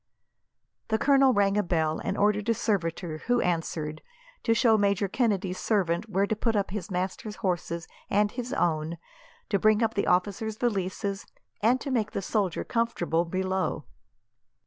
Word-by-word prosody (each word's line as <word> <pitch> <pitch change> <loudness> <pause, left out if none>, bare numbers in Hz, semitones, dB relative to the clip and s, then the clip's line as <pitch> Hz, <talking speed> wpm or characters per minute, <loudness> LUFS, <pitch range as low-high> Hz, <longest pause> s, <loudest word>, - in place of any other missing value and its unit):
The 220 - +1
colonel 275 +1 +5
rang 200 -3 +2
a - - +4
bell, 160 -4 0
and - - -2
ordered 210 +1 +2
a 230 - +3
servitor, 170 -6 -1
who 245 0 +3
answered, 165 -4 -2 0.4
to 230 - +2
show 230 -2 +5
Major 200 -1 +2
Kennedy's 195 -4 0
servant 195 -1 0
where 195 0 +2
to 220 - -1
put 225 +1 0
up 200 -2 0
his 195 -3 -4
master's 190 +3 -3
horses 175 -4 -2 0.2
and 205 +1 +2
his 245 0 -5
own, 165 - 0 0.5
to 200 - +2
bring 215 +2 +4
up 225 - +1
the 200 - -1
officer's 205 +4 0
valises, 200 -3 -2 0.3
and 240 +5 +3
to 280 - -4
make 225 -5 0
the - - -2
soldier 195 -3 0
comfortable 175 -8 0
below. 185 -2 -1
200 Hz, 160 wpm, -27 LUFS, 180-220 Hz, 0.5 s, colonel